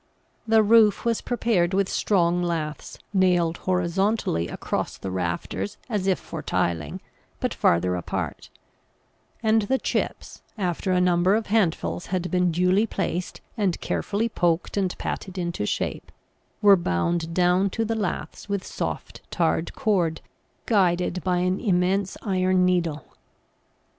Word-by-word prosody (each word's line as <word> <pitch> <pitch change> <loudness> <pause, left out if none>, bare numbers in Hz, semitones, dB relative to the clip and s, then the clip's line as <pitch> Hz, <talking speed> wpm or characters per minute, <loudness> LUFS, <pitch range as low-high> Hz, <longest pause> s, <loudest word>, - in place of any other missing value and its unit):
The 220 0 +5
roof 215 -1 +5
was 230 -1 +1
prepared 205 -7 +1
with 195 -1 +2
strong 175 -4 +1
laths 165 -3 -3 0.2
nailed 180 -3 +3
horizontally 180 - 0
across - - -3
the 95 - -5
rafters 90 - -3
as 205 -4 -1
if 190 -3 +3
for - - -7
tiling, 80 -3 -2 0.4
but - - -1
farther 90 +2 +2
apart; 90 - -4 0.9
and 220 0 +4
the 240 +6 +1
chips, - - -3 0.2
after 185 -1 -1
a 180 - +3
number 180 +2 +3
of 220 0 -1
handfuls 160 - 0
had 180 -1 -2
been 180 -1 +2
duly 180 +6 +2
placed 180 -3 -3
and 200 -6 0
carefully 210 +3 -1
poked 175 -6 0
and 190 -3 -1
patted 190 -1 -5
into 170 - -2
shape, - - -3 0.5
were 200 -1 +8
bound 165 - -1
down 180 +2 +3
to 225 +4 -2
the 225 - -1
laths 210 -1 -4
with 200 -1 -2
soft - - -5
tarred 165 -1 0
cord 180 -7 +1 0.4
guided 180 -4 +1
by 180 -1 +1
an 185 +2 +1
immense 190 -1 +1
iron 185 -2 +2
needle. 170 -4 0
180 Hz, 135 wpm, -25 LUFS, 170-200 Hz, 0.9 s, were